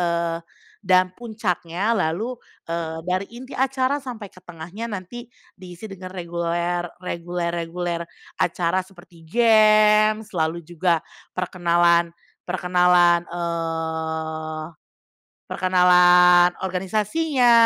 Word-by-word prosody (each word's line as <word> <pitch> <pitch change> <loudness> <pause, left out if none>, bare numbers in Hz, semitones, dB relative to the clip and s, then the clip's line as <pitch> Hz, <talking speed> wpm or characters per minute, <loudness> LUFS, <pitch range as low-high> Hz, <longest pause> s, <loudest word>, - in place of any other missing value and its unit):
eee, 170 -1 -1 0.4
dan 185 0 +4
puncaknya 210 -2 -2
lalu, 200 +8 -1 0.3
eee, 165 -1 -3
dari 185 +2 0
inti 255 +3 -10
acara 265 +1 +1
sampai 235 -6 -7
ke 185 - -17
tengahnya 175 +6 -7
nanti 205 +4 -7 0.3
diisi 180 +1 -10
dengan 185 -1 -9
reguler 175 0 -2 0.2
reguler-reguler 170 -1 -3 0.4
acara 175 +2 0
seperti 175 -3 -18
games, 215 0 +4
lalu 160 +1 0
juga 170 +1 0 0.4
perkenalan 170 -1 +2 0.3
perkenalan, 180 -1 +3
eee, 160 -2 -3 0.8
perkenalan 180 -1 +5 0.2
organisasinya, 215 - +1
180 Hz, 90 wpm, -22 LUFS, 170-205 Hz, 0.8 s, perkenalan